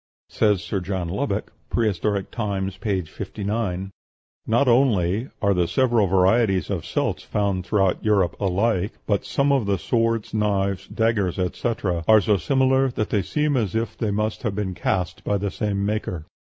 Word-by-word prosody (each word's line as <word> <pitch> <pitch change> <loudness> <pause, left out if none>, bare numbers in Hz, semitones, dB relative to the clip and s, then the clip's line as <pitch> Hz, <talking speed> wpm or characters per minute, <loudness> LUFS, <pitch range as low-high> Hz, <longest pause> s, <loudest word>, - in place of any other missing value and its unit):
Says 105 -3 +2
Sir 100 - -2
John 90 -2 -3
Lubbock 105 +1 -2 0.2
("Prehistoric 105 -2 0
Times," 100 -4 -2
p. 95 -1 -1
59), 100 +2 -4 0.6
"Not 120 +5 +3
only 115 -3 +2
are 100 -1 +4
the 90 -2 +1
several 115 +2 +2
varieties 95 0 +2
of - - -2
celts - - -1
found 100 -3 -1
throughout 95 -2 +1
Europe 100 -5 +2
alike, 100 +1 0
but 100 -2 0
some 140 +1 +1
of 135 -7 +2
the 100 -1 +1
swords, 115 -1 0
knives, 100 -3 0
daggers, 110 -5 0
etc., 90 -2 -1
are 110 -1 +7
so 105 0 +2
similar 130 +8 +2
that 110 -3 -3
they 105 - +2
seem 150 +9 0
as 110 -7 0
if 115 +1 -1
they 110 - -2
must 105 +1 -1
have 105 -4 -2
been 100 -2 -2
cast 90 0 -2
by 105 - 0
the 100 0 -2
same 100 -1 -1
maker." 100 -6 -3
100 Hz, 165 wpm, -23 LUFS, 95-115 Hz, 0.6 s, are